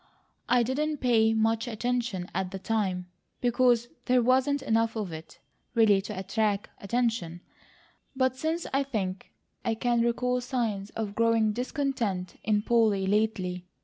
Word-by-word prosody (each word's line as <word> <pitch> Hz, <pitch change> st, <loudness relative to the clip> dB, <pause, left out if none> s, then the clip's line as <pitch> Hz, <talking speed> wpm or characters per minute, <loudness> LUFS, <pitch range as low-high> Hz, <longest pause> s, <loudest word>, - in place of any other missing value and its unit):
"I 245 Hz, 0 st, +4 dB
didn't 295 Hz, +5 st, -1 dB
pay 225 Hz, -4 st, +3 dB
much 225 Hz, +1 st, +1 dB
attention 235 Hz, -5 st, -2 dB
at 190 Hz, 0 st, -1 dB
the 195 Hz, -, -5 dB
time, 190 Hz, -3 st, -1 dB, 0.3 s
because 240 Hz, -1 st, +3 dB, 0.2 s
there 250 Hz, -1 st, +3 dB
wasn't 265 Hz, +3 st, +2 dB
enough 225 Hz, -2 st, +1 dB
of 210 Hz, -5 st, -3 dB
it 160 Hz, 0 st, -10 dB, 0.4 s
really 210 Hz, -4 st, +5 dB
to 210 Hz, 0 st, -7 dB
attract 200 Hz, +1 st, -1 dB
attention; 225 Hz, -6 st, -1 dB, 0.7 s
but 260 Hz, -1 st, +1 dB
since 320 Hz, +5 st, -2 dB
I 275 Hz, -, +3 dB
think, 200 Hz, -9 st, -3 dB, 0.3 s
I 225 Hz, -, 0 dB
can 240 Hz, +1 st, +1 dB
recall 250 Hz, +1 st, +1 dB
signs 230 Hz, -6 st, -2 dB
of 215 Hz, -2 st, -3 dB
growing 225 Hz, -1 st, +2 dB
discontent 240 Hz, -, -2 dB
in 210 Hz, -1 st, +1 dB
Polly, 220 Hz, -5 st, +3 dB
lately. 190 Hz, -3 st, 0 dB
225 Hz, 140 wpm, -28 LUFS, 200-250 Hz, 0.7 s, really